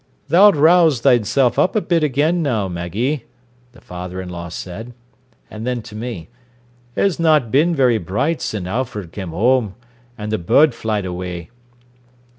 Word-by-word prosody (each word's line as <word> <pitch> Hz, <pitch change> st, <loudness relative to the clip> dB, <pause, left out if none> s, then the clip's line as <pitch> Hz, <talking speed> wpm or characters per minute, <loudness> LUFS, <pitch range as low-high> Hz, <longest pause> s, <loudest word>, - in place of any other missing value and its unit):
"Tha'lt 195 Hz, +5 st, +6 dB
rouse 160 Hz, -3 st, +4 dB
thysen 120 Hz, +2 st, +3 dB
up 185 Hz, -, +2 dB
a -, -, +4 dB
bit 170 Hz, -5 st, 0 dB
again 150 Hz, +5 st, +1 dB
now, 115 Hz, -10 st, 0 dB
Maggie," 100 Hz, -, -3 dB, 0.5 s
the 120 Hz, -, -17 dB
father 90 Hz, +1 st, -7 dB
in 95 Hz, -1 st, -6 dB
law 85 Hz, -1 st, -7 dB
said 110 Hz, +8 st, -8 dB, 0.5 s
and 110 Hz, +2 st, -7 dB
then 125 Hz, -2 st, -2 dB
to 105 Hz, -2 st, -11 dB
me: 110 Hz, -7 st, -6 dB, 0.7 s
"'Er's 195 Hz, -4 st, +1 dB
not 155 Hz, -8 st, +3 dB
bin 165 Hz, +5 st, +3 dB
very 125 Hz, -5 st, +3 dB
bright 130 Hz, -, -1 dB
sin' 100 Hz, -4 st, -3 dB
Alfred 105 Hz, -3 st, -4 dB
come 95 Hz, -4 st, -6 dB
whoam, 110 Hz, +2 st, +1 dB, 0.4 s
an' 105 Hz, -1 st, -5 dB
the 110 Hz, -, -1 dB
bod 140 Hz, -, +4 dB
flyed 110 Hz, -3 st, -2 dB
awee. 90 Hz, +1 st, -6 dB
115 Hz, 155 wpm, -19 LUFS, 95-145 Hz, 0.7 s, Tha'lt